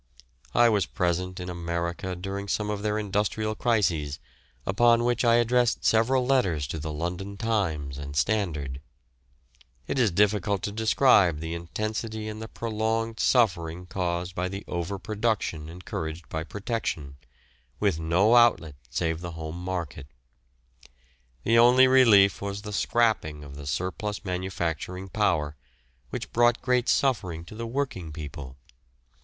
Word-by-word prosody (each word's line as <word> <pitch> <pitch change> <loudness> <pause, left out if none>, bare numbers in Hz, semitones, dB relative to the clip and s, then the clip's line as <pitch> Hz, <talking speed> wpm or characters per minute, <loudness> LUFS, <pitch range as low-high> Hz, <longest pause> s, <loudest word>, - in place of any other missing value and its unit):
I 120 +1 +6
was 105 -6 +2
present 90 +1 -1
in 90 - -5
America 85 +1 -3
during 100 +2 -5
some 105 +1 -1
of 105 -1 -3
their 105 0 0
industrial 105 +1 -1
crises, 90 - 0 0.5
upon 120 +4 +4
which 120 0 +1
I 115 -1 +5
addressed 120 0 +2
several 125 +3 +3
letters 95 - +2
to 80 - -4
the 80 +1 -4
London 90 +6 -4
Times 80 -12 -1
and 70 0 -7
Standard. 75 -5 -1 1.0
It 135 - -2
is 120 -4 +4
difficult 100 +1 +1
to 100 - -2
describe 110 - +4
the 80 +1 -4
intensity 110 +5 -4
and 110 0 -6
the 110 - -6
prolonged 115 0 -2
suffering 90 -8 +2
caused 90 -1 -2
by 90 +1 -2
the 100 +1 -6
over 90 +3 -3
production 105 -7 -2
encouraged 80 -1 -6
by 80 0 -3
Protection, 95 - -4 0.6
with 80 - +1
no 90 +8 +3
outlet 105 - +4
save 80 -1 -1
the 85 -1 -6
home 80 +1 -6
market. 85 -7 -4 1.4
The 115 +1 +4
only 125 +2 +7
relief 105 -8 +6
was 100 0 -4
the 105 -1 -6
"scrapping" 100 -11 +1
of 70 -1 -10
the 70 -1 -8
surplus 95 - -3
manufacturing 90 0 -3
power, 85 -9 0 0.5
which - - -5
brought 120 0 +4
great 125 -1 +1
suffering 95 -11 +1
to - - -11
the 115 +1 -5
working 115 - -3
people. 75 -4 -8
95 Hz, 140 wpm, -27 LUFS, 85-110 Hz, 1.4 s, only